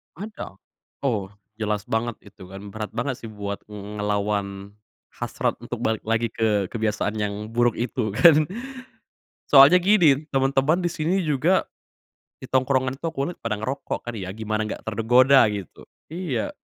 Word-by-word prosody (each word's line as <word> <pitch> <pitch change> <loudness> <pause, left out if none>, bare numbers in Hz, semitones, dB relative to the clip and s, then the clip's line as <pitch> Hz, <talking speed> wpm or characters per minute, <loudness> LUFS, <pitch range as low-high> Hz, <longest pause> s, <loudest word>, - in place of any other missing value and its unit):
Ada, 205 - -8 0.5
oh 110 -8 0 0.3
jelas 105 -2 -1
banget 115 +2 -2
itu 100 -3 -14
kan 100 +1 -10
berat 110 0 -5
banget 130 -3 -2
sih 115 - -8
buat 100 -2 -5
ngelawan, 100 -1 -3 0.4
hasrat - - -3
untuk - - -6
balik 110 -1 0
lagi 115 0 0
ke 105 -4 0
kebiasaan 110 -1 -1
yang 105 +1 -3
buruk 120 0 +2
itu 115 -3 -2
kan, 155 -1 +6 1.0
soalnya 145 +6 +8
gini, 160 -7 +4
temen-temen 135 +3 +2
disini 175 +1 -1
juga, 155 +5 +2 0.8
di - - -9
tongkrongan 130 0 +1
itu 165 - -5
aku 145 -2 -2
lihat 175 - -11
pada 115 -2 -2
ngerokok 130 +7 -4
kan 120 - -6
ya, 95 -1 -6
gimana 110 0 -2
gak - - -6
tergoda 120 +4 +5
gitu. 100 -3 -6 0.2
Iya, 160 -9 -3
115 Hz, 145 wpm, -24 LUFS, 105-140 Hz, 1.0 s, soalnya